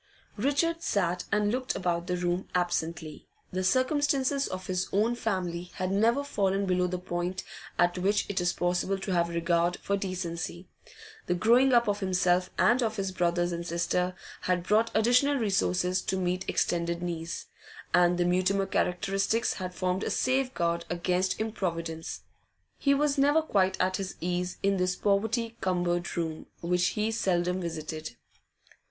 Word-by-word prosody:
Richard 290 +8 +1
sat 180 - 0
and 205 0 +2
looked 255 +2 -1
about 175 -2 -1
the 180 -1 0
room 175 +1 -1
absently. 170 -3 -2 0.2
The 185 0 -2
circumstances 275 +4 +2
of 185 0 -6
his 185 0 -1
own 215 +4 +2
family 180 -6 -2
had 185 -1 -2
never 230 +7 +3
fallen 200 -7 0
below 180 -1 +1
the 180 0 -2
point 180 0 -3 0.3
at 175 +1 +2
which 200 +3 +2
it 190 -2 -1
is 175 0 +2
possible 180 +2 0
to 195 0 -4
have 170 -1 +2
regard 170 +1 +1
for 200 - -1
decency; 180 -2 -4 0.6
the 180 - +1
growing 240 +8 +4
up 235 -2 +4
of 205 0 0
himself 180 -1 +2
and 245 +3 +4
of 220 -2 0
his 195 -2 -2
brothers 175 -1 +1
and 170 0 -3
sister 180 +2 -1 0.3
had 180 -1 0
brought 220 +5 +3
additional 245 +6 +4
resources 190 -5 +1
to 190 - -2
meet 180 +1 -1
extended 170 0 0
needs, 170 -1 -4 0.5
and 175 0 +4
the 175 - +2
Mutimer 185 +2 +2
characteristics 195 +4 0
had 185 -1 -5
formed 185 +1 -1
a - - -1
safeguard 250 -11 0
against 180 +2 0
improvidence. 170 -7 -3 0.6
He 280 -1 +3
was 285 0 +1
never 290 +3 +4
quite 190 -9 +1
at 185 0 +1
his 190 -1 -5
ease 180 +1 -2
in 195 0 +2
this 185 0 +1
poverty 225 +3 0
cumbered 175 -2 -1
room, 160 -2 -3
which 180 +1 +2
he 215 +1 +1
seldom 180 -4 0
visited. 155 -4 -5
185 Hz, 155 wpm, -28 LUFS, 175-210 Hz, 0.6 s, growing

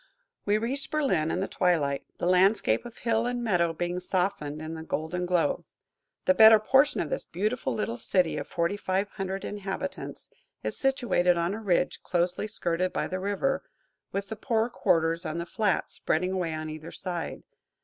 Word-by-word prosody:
We 205 +1 +3
reached 255 +6 -2
Berlin 265 - +1
in 180 - -1
the 195 - -1
twilight, 155 -7 +1
the - - -2
landscape 185 - +3
of 235 - -13
hill 230 0 +1
and 245 0 -2
meadow 175 -7 +2
being 175 +2 -2
softened 180 -5 -1
in 155 +1 -5
the 160 - -6
golden 160 +3 -3
glow. 175 -2 +1 0.6
The 280 - +5
better 220 -3 +9
portion 270 +7 +3
of - - -4
this - - -1
beautiful 215 +8 -2
little 230 +2 -2
city 185 -7 +1
of - - -4
forty 170 +4 -1
five 195 +1 -1
hundred 195 -1 -4
inhabitants 205 +7 -5 0.3
is - - -2
situated 240 -10 +2
on 170 +3 0
a 220 - -5
ridge, 180 -4 +1
closely 180 +3 0
skirted 180 -3 -1
by - - -1
the 185 - -3
river, 205 +8 0 0.5
with 200 0 -3
the 220 - -4
poorer 225 +2 0
quarters 165 -5 +2
on 160 -1 -3
the 170 - -3
flats 205 +1 0
spreading 180 +4 0
away 175 -4 -1
on 155 0 -4
either 155 +1 -8
side. 175 -4 -4
185 Hz, 180 wpm, -28 LUFS, 170-220 Hz, 0.6 s, better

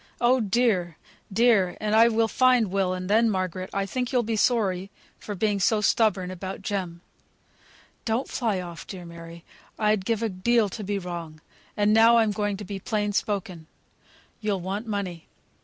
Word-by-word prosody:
Oh 250 +2 +4
dear! 200 -6 +1 0.3
dear! 210 -4 +3
And 215 0 -1
I 225 +1 +7
will 225 -1 +2
find 250 -3 +3
Will; 195 -2 +1
and 185 0 -4
then, 225 +3 +3
Margaret, 185 -2 -2
I 195 0 -1
think 250 +4 -3
you'll 250 -2 +2
be 225 0 -2
sorry 200 -5 +1 0.3
for 205 - -6
being 205 +1 0
so 215 +3 +2
stubborn 205 -3 +1
about 190 +2 -7
Jem." 185 -4 -3 1.0
"Don't 230 +4 -1
fly 220 -7 -1
off, 175 -3 -8
dear 180 -3 -8
Mary; 170 0 -11 0.3
I'd 210 -2 +1
give 230 +2 -1
a 225 - 0
deal 215 +3 +1
to 210 +3 -7
be 200 +1 -2
wrong. 170 -4 -6 0.4
And 210 0 +3
now 225 +1 +6
I'm 220 -2 +3
going 205 -1 -2
to 205 - -8
be 195 +1 -6
plain 210 0 -2
spoken. 190 -6 -3 0.7
You'll 205 -4 -1
want 200 +5 -4
money. 195 -6 -4
205 Hz, 175 wpm, -25 LUFS, 185-225 Hz, 1.0 s, I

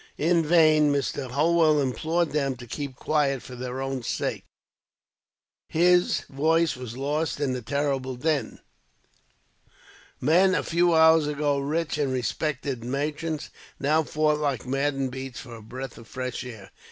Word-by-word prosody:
In 165 +2 +2
vain, 155 -2 +5
Mr. 140 -1 -2
Holwell 155 +2 +3
implored 155 +6 0
them 140 -3 0
to 120 0 -11
keep 140 +2 -5
quiet, 140 -2 0
for 125 - -9
their 125 +1 -4
own 135 -1 -3
sakes. - - -3 1.2
His 175 +2 +3
voice 160 +3 +1
was 125 -2 -8
lost 145 +1 -1
in 140 -3 0
the 125 - -3
terrible 135 +1 -1
din. 150 +3 -1 1.6
Men, 180 +7 +4
a - - 0
few 170 0 +2
hours 160 -1 +6
ago 145 -1 0
rich 150 +2 -2
and 140 -3 0
respected 130 0 -2
merchants, 150 +4 -3 0.3
now 155 +3 +3
fought 150 0 +1
like 140 -4 -1
maddened 135 0 -1
beasts 130 -1 -6
for 120 - -11
a 115 - -10
breath 130 +4 -8
of 115 - -14
fresh 125 0 -4
air. 110 -6 -10
145 Hz, 145 wpm, -26 LUFS, 130-155 Hz, 1.6 s, hours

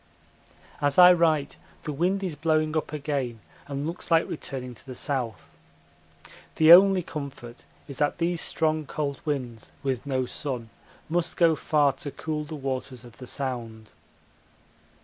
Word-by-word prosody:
As 145 -1 +2
I 180 0 +10
write 160 -4 +1 0.3
the 150 - -4
wind 185 +7 0
is 180 -4 -2
blowing 155 0 +1
up 155 - -1
again 140 -6 -3 0.3
and 140 0 -4
looks 170 +3 -5
like 165 -1 +4
returning 130 -4 -6
to 115 - -16
the 130 -2 -9
south. 120 - -3 1.0
The 160 +1 +8
only 190 0 +7
comfort 140 -6 -8 0.2
is 140 - -8
that 145 - +1
these 170 0 0
strong 155 -2 0
cold 140 -2 -3
winds 125 -7 -4
with 135 -1 -2
no 130 -2 0
sun 125 -4 -5 0.4
must 170 +1 -1
go 165 -2 +5
far 150 -2 +2
to 150 +1 -6
cool 150 +1 -4
the 155 +1 -7
waters 130 -2 -5
of 115 -1 -15
the 125 - -10
Sound. 115 -5 -4
145 Hz, 150 wpm, -26 LUFS, 130-160 Hz, 1.0 s, I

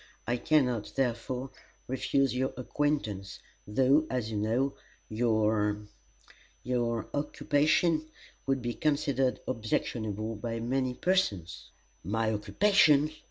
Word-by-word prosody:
I 120 +2 0
can 150 +2 +3
not, 110 -4 -3
therefore, 125 0 -2 0.4
refuse 135 +1 +1
your 130 +1 -1
acquaintance, 125 -7 -2 0.3
though, 135 +8 +3
as 120 -4 -2
you 105 - -2
know, 115 +6 0 0.3
your 110 -2 +1 0.8
your 120 -2 -1
occupation 155 +2 +1 0.4
would 135 -2 0
be 120 0 -1
considered 140 -3 0
objectionable 110 -2 -2
by 115 +2 -4
many 130 +2 -1
persons." 105 - 0 0.3
"My 110 +4 0
occupation!" 150 - +4
125 Hz, 105 wpm, -30 LUFS, 110-140 Hz, 0.8 s, occupation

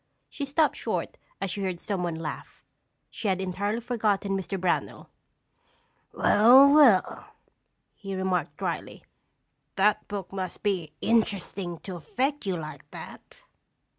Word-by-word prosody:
She 285 - -4
stopped 295 +2 +1
short - - -3 0.2
as 190 - -2
she 200 - -4
heard 185 -3 -2
someone 180 -4 -2
laugh. 160 -1 -7 0.5
She 220 - -4
had 190 -1 +1
entirely 195 +4 -2
forgotten 210 -5 0
Mr. 195 0 -3
Brownell. 180 -1 -2 1.0
"Well, 250 +7 +6
well," 260 -11 +5 0.7
he 195 -1 -7
remarked 190 -1 -1
dryly, - - -4 0.7
"that 205 +2 +2
book 200 -2 -6
must 185 -2 -5
be 185 -7 -1
interesting 200 -5 0
to 185 -3 -7
affect 265 - -2
you 185 -2 0
like 155 -3 -8
that!" - - -11
195 Hz, 125 wpm, -27 LUFS, 185-220 Hz, 1.0 s, Well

